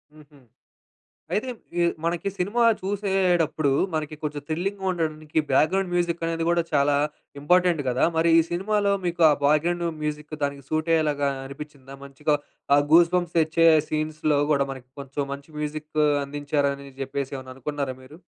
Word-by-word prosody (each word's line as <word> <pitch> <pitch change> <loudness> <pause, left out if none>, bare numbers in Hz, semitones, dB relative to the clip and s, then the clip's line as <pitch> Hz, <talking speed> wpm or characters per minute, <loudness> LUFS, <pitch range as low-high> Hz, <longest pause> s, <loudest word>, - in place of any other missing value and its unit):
హుహు. 150 -1 -18 1.0
అయితే 255 +5 -1 0.3
ఈ - - +4 0.2
మనకి 175 +3 -1
సినిమా 205 +6 +1 0.2
చూసేడప్పుడు, 185 -6 +1 0.2
మనకి 155 0 -2
కొంచెం 150 -1 -3
థ్రిల్లింగ్‌గా 190 +5 -3
ఉండడానికి, 155 -2 -3
బ్యాక్‌గ్రౌండ్ 180 +6 +2
మ్యూజిక్ 170 -1 0
అనేది 165 0 -1
కూడా 170 0 +3
చాలా 140 0 +3 0.5
ఇంపార్టెంట్ 180 0 +3
గదా! 125 0 +2
మరి 165 +1 +3
ఈ - - +6
సినిమాలో 200 +3 +1
మీకు 175 0 -2
ఆ - - +5
బ్యాక్‌గ్రౌండ్ 170 +4 +2 0.2
మ్యూజిక్ 150 0 -4
దానికి 140 -1 -3
సూట్ 155 +1 -1
అయ్యేలాగా 145 -3 +1 0.2
అనిపించిందా? 140 -1 -10
మంచిగా 150 +2 -1 0.4
ఆ - - +6
గూస్‌బంప్స్ 175 0 +4
తెచ్చే 160 +1 +3 0.2
సీన్స్‌లో 155 -1 0
కూడా 140 -2 +3
మనకి 130 -1 -10
కొంచెం 140 +1 -4
మంచి 140 +3 -11
మ్యూజిక్ 150 0 -5 0.3
అందించారని 140 -1 -2
చెప్పేసి 135 0 -3
ఏమైనా 130 0 -9
అనుకున్నారా 140 -1 -4
మీరు? 150 +6 -14
155 Hz, 140 wpm, -25 LUFS, 145-175 Hz, 1.0 s, ఈ